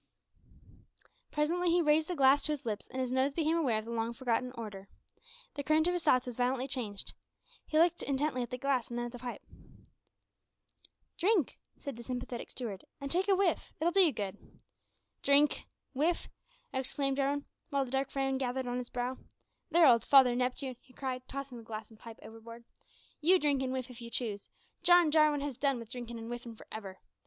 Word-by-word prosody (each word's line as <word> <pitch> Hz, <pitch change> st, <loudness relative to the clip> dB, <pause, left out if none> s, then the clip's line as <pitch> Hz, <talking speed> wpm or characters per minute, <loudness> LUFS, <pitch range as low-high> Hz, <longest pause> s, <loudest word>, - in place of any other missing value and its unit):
Presently 340 Hz, +4 st, +1 dB
he 345 Hz, +1 st, +4 dB
raised 310 Hz, -1 st, +3 dB
the 360 Hz, -, -2 dB
glass 275 Hz, -1 st, +5 dB
to 305 Hz, -, +2 dB
his 290 Hz, -, -6 dB
lips, 215 Hz, -3 st, -3 dB
and 260 Hz, -, -6 dB
his 255 Hz, -1 st, -1 dB
nose 265 Hz, +2 st, +1 dB
became 320 Hz, 0 st, +2 dB
aware 270 Hz, -10 st, +2 dB
of 215 Hz, -, -4 dB
the 230 Hz, -, -6 dB
long 230 Hz, 0 st, -1 dB
forgotten 250 Hz, 0 st, -1 dB
odour! 205 Hz, -4 st, -7 dB, 0.7 s
The 285 Hz, -, -4 dB
current 310 Hz, +3 st, +3 dB
of 355 Hz, -, +2 dB
his 355 Hz, -, -1 dB
thoughts 255 Hz, 0 st, +4 dB
was 245 Hz, -2 st, -6 dB
violently 255 Hz, +1 st, 0 dB
changed. 225 Hz, -7 st, -4 dB, 0.5 s
He 310 Hz, -, 0 dB
looked 340 Hz, +1 st, +4 dB
intently 275 Hz, -1 st, 0 dB
at 240 Hz, -, -3 dB
the 250 Hz, -, -4 dB
glass 260 Hz, -2 st, 0 dB
and 240 Hz, -, -4 dB
then 240 Hz, -, -1 dB
at 240 Hz, -, -6 dB
the 245 Hz, -, -9 dB
pipe. 245 Hz, -1 st, -6 dB, 1.8 s
"Drink," 370 Hz, -, +2 dB, 0.2 s
said 280 Hz, -5 st, -7 dB
the 235 Hz, -, -8 dB
sympathetic 245 Hz, -1 st, -5 dB
steward, 215 Hz, -7 st, -5 dB, 0.2 s
"and 275 Hz, 0 st, -5 dB
take 370 Hz, +3 st, +1 dB
a 390 Hz, -, +5 dB
whiff. 375 Hz, -4 st, 0 dB
It'll 335 Hz, +3 st, +2 dB
do 390 Hz, -, +3 dB
you 350 Hz, -5 st, +7 dB
good." 200 Hz, -5 st, -4 dB, 0.8 s
"Drink! 285 Hz, +1 st, +4 dB, 0.3 s
whiff!" 315 Hz, +6 st, 0 dB, 0.4 s
exclaimed 270 Hz, +1 st, -1 dB
Jarwin, 285 Hz, +1 st, 0 dB, 0.2 s
while 280 Hz, -1 st, +1 dB
a -, -, -10 dB
dark 270 Hz, 0 st, 0 dB
frown 270 Hz, -1 st, -1 dB
gathered 260 Hz, 0 st, -1 dB
on 245 Hz, 0 st, -2 dB
his 245 Hz, -, -6 dB
brow. 250 Hz, +1 st, -3 dB, 0.5 s
"There, 335 Hz, 0 st, +6 dB
old 235 Hz, -5 st, +6 dB
Father 260 Hz, -3 st, +6 dB
Neptune," 255 Hz, +1 st, -2 dB
he 255 Hz, -, -22 dB
cried, 255 Hz, -2 st, -4 dB
tossing 275 Hz, -3 st, -6 dB
the -, -, -11 dB
glass 220 Hz, 0 st, -7 dB
and 220 Hz, -, -17 dB
pipe 230 Hz, 0 st, -10 dB
overboard, 225 Hz, +2 st, -11 dB, 0.6 s
"you 360 Hz, +5 st, +6 dB
drink 290 Hz, -5 st, +1 dB
and 260 Hz, -1 st, -1 dB
whiff, 260 Hz, -1 st, -3 dB
if 240 Hz, -, -11 dB
you 235 Hz, -, -7 dB
choose; 215 Hz, -4 st, -3 dB, 0.3 s
John 350 Hz, -2 st, +6 dB
Jarwin 305 Hz, -2 st, +4 dB
has 280 Hz, -4 st, -4 dB
done 275 Hz, -2 st, +2 dB
wi' 230 Hz, -, -7 dB
drinkin' 235 Hz, 0 st, -7 dB
an' 225 Hz, -, -7 dB
whiffin' 240 Hz, 0 st, -6 dB
for -, -, -14 dB
ever! 195 Hz, -3 st, -7 dB
260 Hz, 200 wpm, -32 LUFS, 240-295 Hz, 1.8 s, you